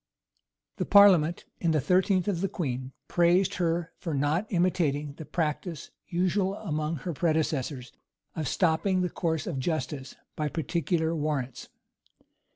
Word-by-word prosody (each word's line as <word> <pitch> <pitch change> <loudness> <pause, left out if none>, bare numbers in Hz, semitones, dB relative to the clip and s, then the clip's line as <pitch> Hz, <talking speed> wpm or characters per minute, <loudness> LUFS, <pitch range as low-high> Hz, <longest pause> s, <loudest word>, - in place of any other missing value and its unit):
[] - - -54
The - - 0
parliament, 180 -5 +6
in 170 - +1
the 155 -1 +3
thirteenth 185 +5 +2
of 185 -4 0
the 195 - 0
queen, 130 -6 -3 0.2
praised 180 +3 +3
her 165 0 0
for 165 -4 -3
not 150 +9 +1
imitating 160 -6 +1
the 155 +1 -9
practice 160 0 -3 0.2
usual 185 +2 0
among 155 -5 -2
her 165 +4 -4
predecessors, 150 -5 -1 0.4
of 155 -3 -2
stopping 180 +5 +2
the 180 - -1
course 160 -4 -1
of 135 - -3
justice 145 -3 -3 0.2
by 150 -1 -1
particular 165 +1 -1
warrants. 145 -5 -3
165 Hz, 140 wpm, -28 LUFS, 150-180 Hz, 0.4 s, parliament